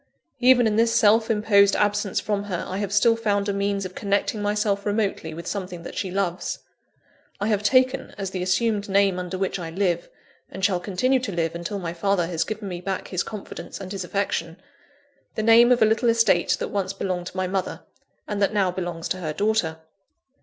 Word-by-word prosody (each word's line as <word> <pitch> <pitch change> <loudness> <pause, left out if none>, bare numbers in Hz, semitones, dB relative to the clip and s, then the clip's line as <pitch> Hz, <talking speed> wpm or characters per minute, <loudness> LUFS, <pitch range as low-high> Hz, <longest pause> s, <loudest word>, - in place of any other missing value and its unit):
Even 250 -1 +5
in 215 -1 +1
this 230 0 +3
self 225 0 +4
imposed 210 -2 +4
absence 205 -1 +1
from 205 -2 -2
her, 180 -4 -3
I 190 - -4
have 200 -2 -3
still 215 +3 +4
found 205 -3 0
a 200 - 0
means 200 0 -1
of 185 - -7
connecting 205 +1 -1
myself 205 -1 0
remotely 205 -6 -1
with 165 +2 -8
something 180 -4 -5
that - - -8
she 190 - -2
loves. 180 -1 -2 0.8
I 205 +2 -1
have 210 -2 +1
taken, 255 +4 +2
as 195 -2 -4
the 185 - -3
assumed 200 +3 0
name 195 -1 +3
under 180 +1 -4
which 190 0 -2
I 165 -2 -5
live, 175 -1 -1 0.4
and 190 0 -2
shall 185 -3 +2
continue 215 +9 +1
to 245 -5 -4
live 165 -2 -1
until 170 +4 -4
my 170 -3 -4
father 180 0 +1
has 165 -1 -1
given 215 +1 -5
me 175 -2 -5
back 190 +1 -4
his 180 -2 -1
confidence 210 -3 -7
and 190 -1 -7
his 195 -2 -4
affection, 175 -3 -2 0.8
the 215 - -1
name 230 +2 +6
of 245 -2 +5
a - - +7
little 225 +2 +2
estate 220 -6 +3
that - - -3
once 195 -1 -2
belonged 185 -2 -3
to 185 - -9
my 185 - 0
mother, 190 0 -3 0.5
and 205 -1 -3
that 200 +2 +1
now 195 -3 +2
belongs 175 -2 -4
to - - -1
her 160 -4 -4
daughter. 205 -4 0
200 Hz, 205 wpm, -24 LUFS, 180-210 Hz, 0.8 s, a